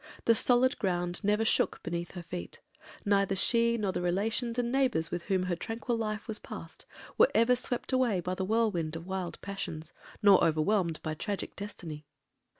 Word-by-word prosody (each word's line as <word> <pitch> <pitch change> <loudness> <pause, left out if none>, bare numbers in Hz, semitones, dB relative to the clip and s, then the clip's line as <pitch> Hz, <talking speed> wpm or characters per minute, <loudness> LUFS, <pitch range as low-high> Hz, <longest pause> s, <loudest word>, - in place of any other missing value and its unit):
The 230 - +6
solid 245 +3 +4
ground 175 -1 -1
never 210 +2 +2
shook - - +1
beneath 170 +1 -4
her 175 - -7
feet; 85 - -7 0.5
neither 200 -1 +2
she, 235 +4 +3
nor 205 -4 0
the 185 - -3
relations 220 +7 -1
and 240 -1 0
neighbours 255 -12 +1
with 175 -1 -4
whom 190 -2 +1
her 180 -1 -1
tranquil 225 +6 -3
life 215 0 -3
was 220 -2 -2
passed, - - -10 0.3
were - - +7
ever 230 +2 +5
swept 245 +1 -4
away 245 -7 +2
by 180 +1 -3
the 190 - -3
whirlwind 195 -7 0
of 165 +1 -7
wild 190 -2 -4
passions, 170 -5 -6 0.3
nor 200 -2 +7
overwhelmed 165 +1 +1
by 155 - -2
tragic 200 +5 -4
destiny. 165 -7 -7
200 Hz, 175 wpm, -30 LUFS, 175-230 Hz, 0.5 s, were